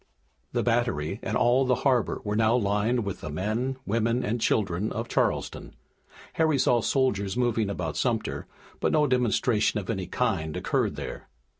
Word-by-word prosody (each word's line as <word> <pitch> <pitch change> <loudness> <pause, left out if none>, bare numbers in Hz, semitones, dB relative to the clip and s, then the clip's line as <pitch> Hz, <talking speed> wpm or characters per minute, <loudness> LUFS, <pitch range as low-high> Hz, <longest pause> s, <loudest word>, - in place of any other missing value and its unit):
The - - 0
Battery 110 -7 0
and - - -1
all 125 +2 +4
the 125 -1 +2
harbor 125 -4 +2
were 105 0 -2
now 110 +1 +3
lined 110 +1 +1
with 100 - -5
the 75 - -5
men, 110 - -2
women 115 +4 0
and 115 +2 -1
children 100 -1 0
of 115 +1 -3
Charleston. - - -1 0.6
Harry 160 -3 +2
saw 120 -2 +3
soldiers 100 -7 0
moving 115 -4 +1
about 90 -6 -3
Sumter, - - -1 0.3
but - - +1
no 150 -1 +4
demonstration 120 -4 +2
of 100 +1 -4
any 95 -5 -3
kind 90 -10 -1
occurred - - 0
there. - - -7
115 Hz, 160 wpm, -27 LUFS, 100-125 Hz, 0.6 s, all